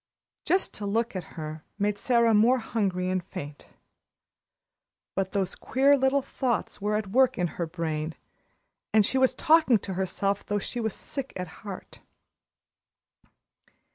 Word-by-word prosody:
Just 375 Hz, +1 st, +1 dB
to 205 Hz, -, -5 dB
look 225 Hz, +2 st, 0 dB
at 185 Hz, -, -6 dB
her 155 Hz, 0 st, -6 dB
made 205 Hz, 0 st, 0 dB
Sara 235 Hz, -2 st, +3 dB
more 230 Hz, +5 st, +5 dB
hungry 195 Hz, -6 st, -1 dB
and 185 Hz, -1 st, 0 dB
faint. 150 Hz, -6 st, -8 dB, 1.5 s
But 190 Hz, -1 st, -1 dB
those 195 Hz, -2 st, -1 dB
queer 275 Hz, +2 st, +3 dB
little 270 Hz, 0 st, +2 dB
thoughts 250 Hz, -6 st, -2 dB
were 210 Hz, +1 st, 0 dB
at 210 Hz, -3 st, -2 dB
work 260 Hz, +3 st, +4 dB
in 180 Hz, -, +1 dB, 0.2 s
her 170 Hz, -, 0 dB
brain, 160 Hz, -2 st, -3 dB, 0.8 s
and 215 Hz, -2 st, +6 dB
she 265 Hz, -, +1 dB
was 260 Hz, -1 st, +3 dB
talking 315 Hz, -7 st, +5 dB
to 195 Hz, -1 st, -6 dB
herself 195 Hz, +2 st, -1 dB
though 205 Hz, -, -1 dB
she 240 Hz, +4 st, -3 dB
was 220 Hz, -3 st, -2 dB
sick 275 Hz, -2 st, -5 dB
at 180 Hz, -1 st, -4 dB
heart. 200 Hz, -3 st, -8 dB
205 Hz, 145 wpm, -27 LUFS, 185-250 Hz, 1.5 s, and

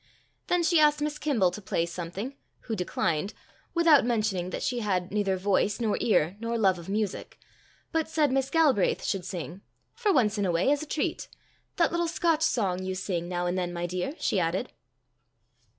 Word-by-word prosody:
Then 355 Hz, -1 st, +2 dB
she 330 Hz, 0 st, +4 dB
asked 300 Hz, -1 st, +4 dB
Miss 300 Hz, 0 st, -2 dB
Kimble 225 Hz, -12 st, +2 dB
to 210 Hz, -, -7 dB
play 170 Hz, -3 st, -1 dB
something, 180 Hz, +9 st, -6 dB, 0.3 s
who 225 Hz, -, -4 dB
declined, 180 Hz, 0 st, -1 dB, 0.4 s
without 330 Hz, -4 st, +6 dB
mentioning 215 Hz, -6 st, 0 dB
that -, -, -4 dB
she 245 Hz, -1 st, -1 dB
had 185 Hz, -5 st, -1 dB
neither 200 Hz, -2 st, 0 dB
voice 200 Hz, +3 st, +1 dB
nor 220 Hz, -3 st, +1 dB
ear 185 Hz, -4 st, +2 dB
nor 230 Hz, +1 st, -2 dB
love 190 Hz, -5 st, +3 dB
of 170 Hz, -, -10 dB
music, 210 Hz, -1 st, -3 dB, 0.5 s
but 320 Hz, -1 st, 0 dB
said 305 Hz, -4 st, +2 dB
Miss 270 Hz, 0 st, +1 dB
Galbraith 285 Hz, -, +3 dB
should 195 Hz, -3 st, -1 dB
sing 175 Hz, +1 st, -6 dB, 0.3 s
"for 460 Hz, -4 st, +1 dB
once 220 Hz, -, +2 dB
in 200 Hz, -, +1 dB
a -, -, +1 dB
way, 175 Hz, +11 st, +2 dB
as 290 Hz, 0 st, +1 dB
a 310 Hz, -, -6 dB
treat. 295 Hz, -, -2 dB, 0.5 s
That 345 Hz, -, +2 dB
little 340 Hz, 0 st, 0 dB
Scotch 330 Hz, -1 st, +1 dB
song 195 Hz, -, +1 dB
you 185 Hz, 0 st, -3 dB
sing 180 Hz, -2 st, -3 dB
now 175 Hz, -1 st, -2 dB
and 175 Hz, +1 st, 0 dB
then, 180 Hz, -1 st, -1 dB
my 175 Hz, 0 st, -3 dB
dear," 180 Hz, -, -3 dB
she 195 Hz, -, 0 dB
added. 170 Hz, +2 st, -1 dB
210 Hz, 190 wpm, -28 LUFS, 180-290 Hz, 0.5 s, without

